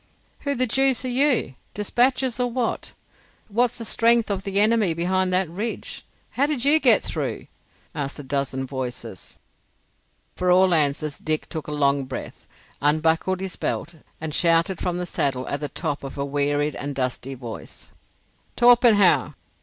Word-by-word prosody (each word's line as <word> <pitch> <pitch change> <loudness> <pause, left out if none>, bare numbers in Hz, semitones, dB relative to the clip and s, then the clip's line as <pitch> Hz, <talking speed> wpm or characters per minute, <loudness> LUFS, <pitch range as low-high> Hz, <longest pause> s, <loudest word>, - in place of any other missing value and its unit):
"Who 280 -1 -2
the 255 0 +2
deuce 265 +2 +2
are - - -1
you? 255 - +2 0.2
Despatches 250 +4 +1
or 245 0 +1
what? 240 -1 -3 0.6
What's 240 +3 +1
the 230 - -6
strength 230 -1 +3
of 195 -1 -2
the 200 0 -1
enemy 210 -5 +3
behind 185 +2 0
that 185 0 +1
ridge? 205 +8 -5 0.3
How 280 +2 +1
did 280 -4 -1
you 300 +3 +5
get - - +4
through?" - - -3 0.5
asked 140 -1 -4
a 145 - -7
dozen 135 -1 -2
voices. 125 -6 -6 1.0
For 180 - -1
all 185 0 +5
answer 150 -1 +1
Dick 155 -1 0
took 160 -2 -6
a - - -5
long 140 -2 +1
breath, 130 - -8 0.3
unbuckled 160 +5 +1
his 190 -2 -4
belt, 170 - -3 0.3
and 160 -1 -5
shouted 170 +2 +2
from 175 -1 -1
the 180 - -3
saddle 135 -6 -2
at 140 - -3
the 145 - -4
top 145 0 -3
of 135 +1 -7
a 140 - -2
wearied 145 +1 0
and 145 0 -5
dusty 130 0 -3
voice, 120 -3 -10 0.6
"Torpenhow! 240 -5 +5
180 Hz, 160 wpm, -23 LUFS, 145-230 Hz, 1.0 s, you